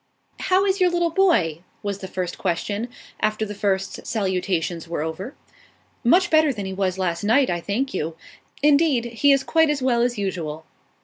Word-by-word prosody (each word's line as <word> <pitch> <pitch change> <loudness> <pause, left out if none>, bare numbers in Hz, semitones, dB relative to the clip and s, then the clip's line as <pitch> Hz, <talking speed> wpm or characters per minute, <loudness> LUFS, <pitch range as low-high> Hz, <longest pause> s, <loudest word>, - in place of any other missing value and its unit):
"How 375 +1 +2
is 385 0 0
your 365 - +5
little 345 -1 +1
boy?" 250 - +2 0.2
was 200 -1 -3
the 190 - -6
first 180 -2 -4
question, 200 +5 -2 0.3
after 215 0 0
the 210 - -6
first 195 -1 -2
salutations 180 -5 -1
were 165 -2 -2
over. 170 - -5 0.7
"Much 350 +9 +4
better 315 -2 +5
than 205 -6 -5
he 190 - -4
was 190 -1 -1
last 175 -2 -1
night, 250 +4 +3
I 175 -1 -2
thank 240 +9 -2
you. 160 -3 -3 0.5
Indeed, 290 -4 +4
he 240 +4 +2
is 275 -1 +3
quite 320 +1 +3
as 285 -3 -1
well 240 -2 +2
as 240 -1 0
usual." 165 -6 -4
205 Hz, 180 wpm, -23 LUFS, 185-285 Hz, 0.7 s, your